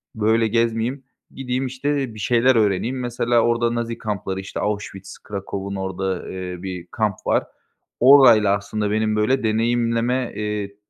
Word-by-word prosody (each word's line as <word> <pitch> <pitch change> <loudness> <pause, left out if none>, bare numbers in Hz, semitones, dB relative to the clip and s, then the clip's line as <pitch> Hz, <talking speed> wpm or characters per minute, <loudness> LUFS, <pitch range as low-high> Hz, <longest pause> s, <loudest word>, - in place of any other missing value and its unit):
böyle 110 +1 +2
gezmeyeyim, 115 +4 0 0.3
gideyim, 130 0 -3
işte, 130 -1 -2
bir - - -9
şeyler 120 +4 +3
öğreneyim." 110 +4 +1
Mesela 120 -1 +1
orada 120 0 +1
Nazi 115 0 -3
kampları, 100 -3 -4
işte, 95 - -6
Auschwitz, 100 -2 -4
Kraków’un 100 -1 -6
orada, 95 -1 -3
eee, 90 -1 -6
bir 90 -2 -6
kamp 105 -3 0
var. - - +2 0.6
Orayla 120 -7 +7
aslında 105 +1 -3
benim, 110 0 +1
böyle, 110 +5 +1
deneyimleme, 115 +2 0
eee, 105 -1 -4
110 Hz, 140 wpm, -21 LUFS, 100-120 Hz, 0.6 s, Orayla